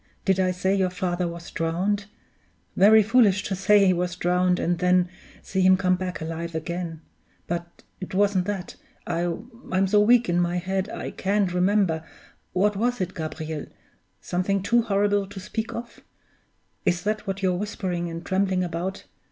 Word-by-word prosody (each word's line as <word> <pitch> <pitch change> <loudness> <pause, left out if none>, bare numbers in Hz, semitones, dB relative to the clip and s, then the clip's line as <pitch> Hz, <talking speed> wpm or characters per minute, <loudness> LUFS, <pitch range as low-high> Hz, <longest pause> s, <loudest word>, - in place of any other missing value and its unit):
Did 190 -1 +2
I 185 -1 +3
say 185 +1 0
your 190 -2 +2
father 180 -1 -2
was 170 0 -8
drowned? 185 +5 -1 0.7
Very 215 +2 +7
foolish 210 -3 +4
to 195 - -2
say 200 +2 +4
he 185 - +5
was 180 0 -2
drowned, 180 0 +2
and 175 -1 0
then 180 0 +3 0.4
see 190 - -1
him 185 0 +6
come 185 -1 +2
back 180 0 -4
alive 165 +1 -5
again! 165 0 -4 0.4
But 170 0 -5 0.2
it 185 0 -6
wasn't 200 -2 +2
that 195 -3 -4 0.3
I'm 185 +4 -2
so 205 +2 +3
weak 235 +2 +5
in 175 0 +1
my 175 0 +1
head, 190 +3 -2
I - - -5
can't 195 -1 0
remember. 180 -3 +2 0.5
What 205 +3 +2
was 245 +4 0
it, 185 0 -2
Gabriel? 155 -1 -5 0.5
Something 185 +2 -1
too 235 +3 +3
horrible 205 -2 +1
to 200 0 -9
speak 220 +4 -4
of? 235 0 -7 0.8
Is 175 -3 +1
that 210 0 -2
what 195 0 -3
you're 185 -1 +3
whispering 180 -3 -3
and 165 0 -7
trembling 190 -1 +1
about? 180 +3 -4
185 Hz, 165 wpm, -25 LUFS, 175-200 Hz, 0.8 s, Very